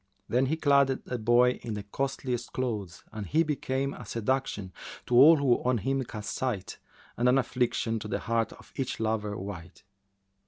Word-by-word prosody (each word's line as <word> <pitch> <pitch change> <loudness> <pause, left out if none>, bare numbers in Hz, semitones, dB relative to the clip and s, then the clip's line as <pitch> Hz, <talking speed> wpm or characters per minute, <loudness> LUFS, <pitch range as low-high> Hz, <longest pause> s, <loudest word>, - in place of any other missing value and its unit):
Then 125 +3 +2
she 160 +4 0
clad 140 -3 +4
the 130 -2 -3
boy 120 +3 +4
in 110 -2 -4
the 105 - -5
costliest 125 +2 -3
clothes 105 -10 -3
and 105 -3 -6
he 160 +2 +3
became 140 -2 -2
a - - -9
seduction 115 -4 -2 0.3
to - - -4
all 150 +6 +9
who 135 -4 +2
on 125 -1 +2
him 135 +5 -1
cast 105 -2 -6
sight 115 -8 -3 0.4
and 120 +1 +3
an 130 - +4
affliction 120 -3 0
to 105 - -6
the - - -1
heart 115 -1 -1
of - - -17
each 135 -2 -3
lover 110 -2 -1
wight. 90 -3 -8
120 Hz, 180 wpm, -28 LUFS, 105-135 Hz, 0.4 s, all